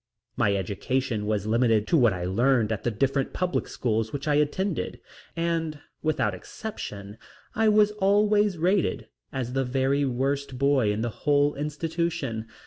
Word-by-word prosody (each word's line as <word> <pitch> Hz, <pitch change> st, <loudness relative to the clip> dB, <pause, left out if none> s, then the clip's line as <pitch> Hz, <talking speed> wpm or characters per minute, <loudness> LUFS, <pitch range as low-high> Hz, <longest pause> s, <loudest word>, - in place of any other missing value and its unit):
My 100 Hz, -, +2 dB
education 105 Hz, +3 st, -2 dB
was 105 Hz, -2 st, 0 dB
limited 115 Hz, -1 st, +2 dB
to -, -, +3 dB
what 120 Hz, -8 st, +5 dB
I 90 Hz, -2 st, -3 dB
learned 115 Hz, +3 st, +2 dB
at 110 Hz, -, -3 dB
the -, -, +1 dB
different 135 Hz, +4 st, 0 dB
public 180 Hz, 0 st, -1 dB
schools 110 Hz, -2 st, -1 dB
which 145 Hz, +1 st, -5 dB
I 150 Hz, -, +3 dB
attended, 150 Hz, +6 st, 0 dB, 0.4 s
and 165 Hz, -2 st, -1 dB, 0.2 s
without 150 Hz, -10 st, 0 dB
exception 100 Hz, -, -7 dB, 0.3 s
I 220 Hz, -1 st, +3 dB
was 210 Hz, 0 st, +5 dB
always 205 Hz, -1 st, +2 dB
rated 180 Hz, +4 st, 0 dB, 0.2 s
as 125 Hz, -2 st, -3 dB
the 135 Hz, 0 st, +1 dB
very 135 Hz, +2 st, +1 dB
worst 135 Hz, +1 st, -1 dB
boy 135 Hz, -5 st, +3 dB
of 105 Hz, +2 st, -2 dB
the 120 Hz, -, -1 dB
whole 145 Hz, +4 st, +2 dB
institution. 150 Hz, -5 st, -3 dB
135 Hz, 150 wpm, -26 LUFS, 110-165 Hz, 0.4 s, what